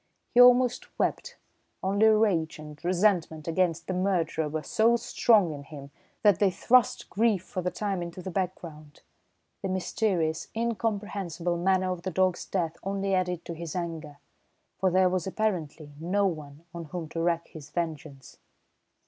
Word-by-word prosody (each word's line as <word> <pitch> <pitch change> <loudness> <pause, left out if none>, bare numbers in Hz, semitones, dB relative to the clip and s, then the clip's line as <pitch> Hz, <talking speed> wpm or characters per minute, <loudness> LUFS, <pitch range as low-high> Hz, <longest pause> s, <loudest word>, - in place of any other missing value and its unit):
He 245 - +7
almost 250 0 +5
wept, - - -1 0.5
only 200 +3 +3
rage 205 -7 +2
and 150 0 -11
resentment 175 -4 +1
against 170 -1 0
the 185 - -3
murderer 175 -4 0
were 155 +1 -3
so 230 +2 +3
strong 220 -6 +3
in 145 - -7
him 140 -1 -11 0.3
that 205 -5 +5
they 200 - +4
thrust 245 +6 +2
grief 215 -3 +1
for 185 0 -5
the 180 - -1
time 195 -2 -3
into 170 +1 -6
the 190 - -5
background. 170 -5 -5 0.6
The 195 - -3
mysterious, 185 -3 -1
incomprehensible 200 -7 -2
manner 185 +1 +1
of 180 -2 -4
the 185 - -3
dog's 185 0 +1
death 170 -4 -2
only 195 0 -2
added 180 -2 -1
to 170 - -5
his 165 0 -7
anger, 165 -4 -5 0.6
for 190 - +3
there 185 +1 +4
was 180 0 -1
apparently 165 -8 -2
no 190 +5 +1
one 155 -3 -5
on 170 -1 -6
whom 165 +1 -6
to 165 - -3
wreak 170 0 0
his 150 -2 -11
vengeance. 155 -5 -5
180 Hz, 155 wpm, -28 LUFS, 160-195 Hz, 0.6 s, He